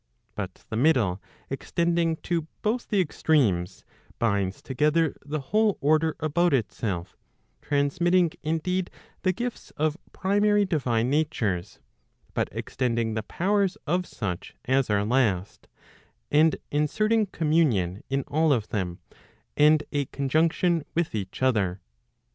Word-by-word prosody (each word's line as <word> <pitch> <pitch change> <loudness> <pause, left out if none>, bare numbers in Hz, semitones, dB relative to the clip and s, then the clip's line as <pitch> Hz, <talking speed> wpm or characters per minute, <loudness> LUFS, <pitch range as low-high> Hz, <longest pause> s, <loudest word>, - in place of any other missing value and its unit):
But - - -6
the - - -2
middle 115 - +2 0.3
extending 170 +3 0
to 165 -2 -1 0.2
both 230 +3 0
the 205 - +2
extremes, 110 - +1 0.3
binds 100 -4 0
together 150 +3 +1
the 150 +2 -3
whole 210 +8 +2
order 155 +2 +2
about 165 +1 +2
itself; 100 -6 -3 0.5
transmitting 170 +5 +2
indeed, 175 +4 -1 0.3
the 185 - +2
gifts 240 +6 -5
of 155 +2 0
primary 205 +1 +2
divine 125 -9 0
natures, 115 - -1 0.6
but - - 0
extending 115 -3 -1
the 110 - -1
powers 195 - 0
of 175 +3 0
such 90 -6 -5
as 130 0 +2
are 100 -1 +2
last, 110 -5 0 0.6
and 155 +2 +5 0.2
inserting 215 +9 +2
communion 150 - +1
in 135 0 0
all 155 +3 +1
of 115 -6 +1
them, 90 -4 -2 0.6
and 150 +1 +5
a 145 -2 0
conjunction 160 +5 +1
with 170 -1 0
each 100 +3 -4
other. 100 -8 +1
150 Hz, 120 wpm, -26 LUFS, 115-170 Hz, 0.6 s, and